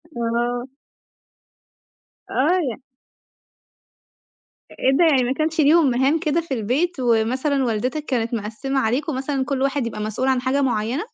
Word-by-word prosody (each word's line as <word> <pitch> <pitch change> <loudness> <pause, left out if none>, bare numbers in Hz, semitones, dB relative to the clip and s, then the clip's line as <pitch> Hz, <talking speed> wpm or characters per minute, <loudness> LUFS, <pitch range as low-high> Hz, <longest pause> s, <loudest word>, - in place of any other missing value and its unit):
آه. 240 +1 -1 1.6
آه، 320 +8 +2 0.2
ي 275 - -14 1.9
أ - - -14
إيه 265 - +3
ده 345 - +5
يعني 275 -6 +4
ما 245 - -1
كانش 315 +2 0
ليهم 300 0 +5
مهام 270 +6 +2
كده 330 0 0
في 315 -5 -5
البيت 265 - -1
ومثلًا 255 +4 +1
والدتك 250 +7 -2
كانت 235 -4 -1
مقسِّمة 230 +6 -2
عليكم 265 +5 -1
مثلًا 270 0 -2
كل 275 -2 -2
واحد 270 -3 0
يبقى 215 -2 -6
مسؤول 220 +5 -2
عن 260 -2 +2
حاجة 265 +2 0
معيّنة؟ 245 - -1
265 Hz, 145 wpm, -22 LUFS, 235-290 Hz, 1.9 s, ده